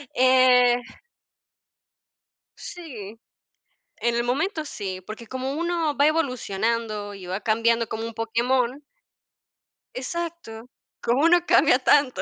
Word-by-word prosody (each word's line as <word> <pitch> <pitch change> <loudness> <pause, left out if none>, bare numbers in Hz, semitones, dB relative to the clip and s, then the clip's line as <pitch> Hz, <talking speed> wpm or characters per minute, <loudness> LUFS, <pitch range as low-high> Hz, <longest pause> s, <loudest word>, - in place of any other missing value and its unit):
Eh 250 -1 +5 1.8
Sí, 230 - -9 0.8
en 235 0 0
el 235 0 0
momento 310 - -1
sí, 195 -9 -6
porque 215 +5 -10
como 260 +3 -4
uno 335 -2 -1
va 285 - +4
evolucionando 230 -8 -1
y 190 -2 -10
va 185 +3 -3
cambiando 230 +1 +1
como 225 - -4
un 230 0 -6
Pokémon 240 +4 0 1.1
exacto, 265 -5 -6 0.3
como 245 +5 +1
uno 345 +1 +4
cambia - - +4
tanto. 265 -9 +3
245 Hz, 110 wpm, -24 LUFS, 225-285 Hz, 1.8 s, Eh